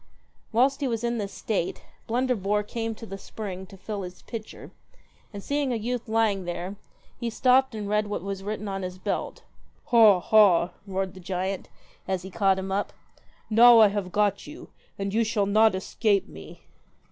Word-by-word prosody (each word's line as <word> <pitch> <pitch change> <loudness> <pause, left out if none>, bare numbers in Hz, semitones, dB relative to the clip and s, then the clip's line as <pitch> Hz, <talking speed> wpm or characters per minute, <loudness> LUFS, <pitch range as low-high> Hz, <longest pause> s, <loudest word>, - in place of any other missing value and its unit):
Whilst 260 +4 +3
he 275 - +1
was 230 -2 -2
in 235 -1 -1
this 200 -1 -4
state, 200 -6 -3 0.2
Blunderbore 225 -4 0
came 225 +1 -4
to 225 - -10
the 195 -2 -8
spring 190 -4 -7
to 195 - -14
fill 205 +1 -5
his 180 -1 -9
pitcher, 225 -2 -8 0.6
and 200 -2 -8
seeing 285 -2 -1
a - - 0
youth 235 +2 -3
lying 220 -4 +1
there, 175 +3 -4 0.4
he 235 - -2
stopped 255 +1 +3
and 210 -2 -4
read 210 +1 +1
what 205 - -4
was 195 -1 -4
written 210 +1 -4
on 195 -1 -3
his 185 0 -5
belt. - - -4 0.2
' - - -35
Ha 220 -5 +7
ha! 180 -3 +4
' 200 - -32
roared 190 -1 -2
the 190 - -12
giant, 185 +1 -3 0.4
as 190 -2 -2
he 190 - -9
caught 195 -1 +2
him 190 0 -4
up. 200 +1 -1 0.5
'Now 235 +2 +7
I 215 -2 +7
have 200 -2 -3
got 205 -1 0
you, 305 +3 -11 0.3
and 195 0 -3
you 230 +1 +3
shall 215 -2 0
not 215 +1 +4
escape 200 +1 0
me.' 80 0 -12
205 Hz, 190 wpm, -26 LUFS, 190-225 Hz, 0.6 s, Ha